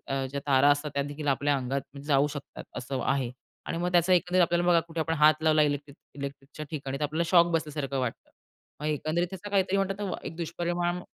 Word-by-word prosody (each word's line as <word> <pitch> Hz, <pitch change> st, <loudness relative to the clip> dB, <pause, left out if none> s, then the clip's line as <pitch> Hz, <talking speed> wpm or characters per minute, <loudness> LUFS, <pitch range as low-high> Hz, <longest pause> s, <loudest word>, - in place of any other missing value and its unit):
अ, 135 Hz, 0 st, -1 dB
ज्या 140 Hz, +1 st, -3 dB
तारा 140 Hz, +1 st, +5 dB
असतात, 145 Hz, +1 st, +1 dB
त्यादेखील 145 Hz, +1 st, -3 dB
आपल्या 140 Hz, +1 st, +2 dB
अंगात 135 Hz, +2 st, -4 dB
जाऊ 140 Hz, -1 st, +4 dB
शकतात 145 Hz, -1 st, -8 dB
असं 130 Hz, +1 st, -3 dB
आहे 135 Hz, -3 st, 0 dB, 0.4 s
आणि 165 Hz, -, -2 dB
मग 180 Hz, +1 st, -1 dB
त्याचा 175 Hz, +1 st, +4 dB
एकंदरीत 180 Hz, +1 st, +4 dB
आपल्याला, 175 Hz, +1 st, +2 dB
बघा 170 Hz, -1 st, +6 dB
कुठे 165 Hz, 0 st, -3 dB
आपण 160 Hz, +1 st, 0 dB
हात 155 Hz, +1 st, +5 dB
लावला 155 Hz, -1 st, +4 dB
इलेक्ट्रिक 145 Hz, -1 st, -1 dB, 0.2 s
इलेक्ट्रिकच्या 140 Hz, +1 st, -7 dB
ठिकाणी, 135 Hz, -3 st, -4 dB
तर -, -, -6 dB
आपल्याला 155 Hz, +3 st, 0 dB
शॉक 170 Hz, -2 st, +7 dB
बसल्यासारखं 150 Hz, -4 st, -2 dB
वाटतं. 125 Hz, -3 st, -4 dB, 0.5 s
मग 150 Hz, -, -3 dB
एकंदरीत 155 Hz, +3 st, 0 dB
त्याचा 195 Hz, +2 st, -7 dB
काहीतरी 195 Hz, -1 st, +2 dB
म्हणतात 195 Hz, 0 st, 0 dB
ना, 190 Hz, -, -2 dB
एक 160 Hz, -, -6 dB
दुष्परिणाम 175 Hz, +1 st, -2 dB
150 Hz, 200 wpm, -28 LUFS, 140-175 Hz, 0.5 s, शॉक